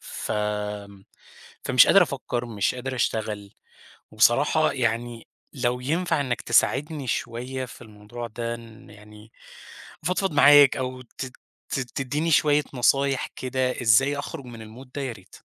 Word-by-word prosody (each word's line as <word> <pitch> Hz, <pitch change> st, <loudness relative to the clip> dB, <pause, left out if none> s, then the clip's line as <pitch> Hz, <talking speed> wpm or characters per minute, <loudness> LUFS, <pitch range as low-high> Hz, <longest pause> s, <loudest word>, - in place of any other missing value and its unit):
ف -, -, -6 dB, 1.3 s
فمش -, -, +6 dB
قادر -, -, +7 dB
أفكّر، 120 Hz, 0 st, -3 dB
مش 105 Hz, -2 st, -1 dB
قادر 130 Hz, +1 st, -5 dB
أشتغل، 105 Hz, -4 st, -2 dB, 0.6 s
وبصراحة 130 Hz, +8 st, +3 dB
يعني 115 Hz, -1 st, -2 dB, 0.3 s
لو 125 Hz, -2 st, -1 dB
ينفع 165 Hz, +4 st, 0 dB
إنَّك 130 Hz, -4 st, -2 dB
تساعدني 145 Hz, +1 st, +1 dB
شوية 125 Hz, +2 st, -3 dB
في 125 Hz, 0 st, -12 dB
الموضوع 110 Hz, +2 st, -9 dB
ده، 115 Hz, +1 st, -4 dB
إن 115 Hz, +2 st, -13 dB
يعني 105 Hz, +1 st, -15 dB, 0.7 s
أفضفض 185 Hz, +3 st, 0 dB
معاك، 145 Hz, -1 st, +7 dB
أو 130 Hz, -1 st, -4 dB
ت 130 Hz, +2 st, -8 dB, 0.4 s
ت -, -, -1 dB
تديني 135 Hz, +6 st, -2 dB
شوية 150 Hz, -1 st, +4 dB
نصايح 135 Hz, +2 st, +2 dB
كده، 130 Hz, 0 st, -2 dB
إزاي 135 Hz, +5 st, +4 dB
أخرُج 145 Hz, -1 st, -6 dB
من 120 Hz, -2 st, -10 dB, 0.2 s
الMood -, -, -23 dB
ده 145 Hz, -, -3 dB
يا 130 Hz, -3 st, -3 dB
ريت. 95 Hz, -4 st, -15 dB
125 Hz, 135 wpm, -25 LUFS, 115-140 Hz, 1.3 s, قادر